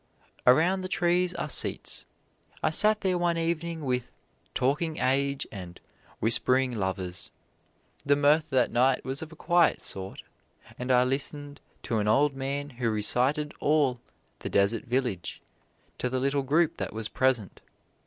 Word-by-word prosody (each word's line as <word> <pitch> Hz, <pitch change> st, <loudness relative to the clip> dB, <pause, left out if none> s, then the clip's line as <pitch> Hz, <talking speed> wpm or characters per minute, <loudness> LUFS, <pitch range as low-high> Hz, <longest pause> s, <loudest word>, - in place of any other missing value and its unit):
Around 170 Hz, +9 st, +4 dB
the 185 Hz, -, -4 dB
trees 180 Hz, 0 st, +1 dB
are -, -, -3 dB
seats. 145 Hz, -, 0 dB, 0.6 s
I 155 Hz, -, +2 dB
sat 215 Hz, +6 st, +3 dB
there 185 Hz, -3 st, 0 dB
one 170 Hz, -1 st, +1 dB
evening 165 Hz, -1 st, -2 dB
with 125 Hz, -2 st, -2 dB, 0.4 s
"talking 150 Hz, +5 st, 0 dB
age" 140 Hz, +1 st, 0 dB
and 90 Hz, -4 st, -9 dB, 0.4 s
"whispering 125 Hz, +3 st, +2 dB
lovers." 95 Hz, -3 st, -3 dB, 0.7 s
The 145 Hz, 0 st, +3 dB
mirth 150 Hz, +2 st, +3 dB
that 130 Hz, -3 st, +2 dB
night 125 Hz, +2 st, +2 dB
was 135 Hz, +1 st, -2 dB
of 160 Hz, 0 st, -8 dB
a -, -, -12 dB
quiet 175 Hz, +1 st, +2 dB
sort, 95 Hz, 0 st, -4 dB, 0.6 s
and 125 Hz, +1 st, -2 dB
I 125 Hz, 0 st, +5 dB
listened 145 Hz, +2 st, -2 dB, 0.2 s
to 115 Hz, -, -1 dB
an 105 Hz, -, -1 dB
old 140 Hz, +6 st, +3 dB
man 140 Hz, +2 st, -4 dB
who 120 Hz, -2 st, -2 dB
recited 125 Hz, +8 st, +2 dB
all 145 Hz, -5 st, +2 dB, 0.4 s
"The -, -, -5 dB
Deserted 110 Hz, +5 st, +1 dB
Village" 125 Hz, -8 st, -2 dB, 0.6 s
to 125 Hz, -, -1 dB
the 130 Hz, +1 st, -1 dB
little 140 Hz, +2 st, 0 dB
group 160 Hz, +5 st, +1 dB
that -, -, -4 dB
was 110 Hz, 0 st, -3 dB
present. 125 Hz, -6 st, 0 dB
135 Hz, 150 wpm, -27 LUFS, 125-155 Hz, 0.7 s, I